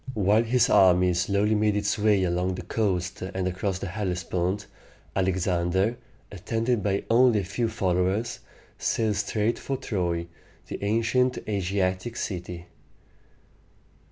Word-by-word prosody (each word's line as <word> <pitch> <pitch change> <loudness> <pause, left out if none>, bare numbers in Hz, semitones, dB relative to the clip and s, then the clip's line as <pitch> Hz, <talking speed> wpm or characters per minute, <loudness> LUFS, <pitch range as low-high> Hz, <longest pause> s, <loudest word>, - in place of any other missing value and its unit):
While 105 +1 +3
his 120 0 +3
army 90 -1 +5
slowly 100 +5 +1
made 105 -1 +2
its 105 +1 0
way 105 -2 +3
along 90 +1 0
the - - -6
coast 95 -5 -1
and 95 0 -3
across 95 +1 -2
the 95 - -5
Hellespont, 90 0 -2 0.5
Alexander, 95 +2 +1 0.4
attended 115 +4 -1
by 100 0 0
only 115 -2 +4
a - - -6
few 110 +5 -2
followers, 95 +1 0 0.4
sailed 110 -3 0
straight 105 +3 0
for 135 - -3
Troy, 90 -9 -2 0.4
the - - -6
ancient 115 +4 +1
Asiatic 95 +1 -1
city. 90 -2 -5
100 Hz, 125 wpm, -26 LUFS, 90-110 Hz, 0.5 s, army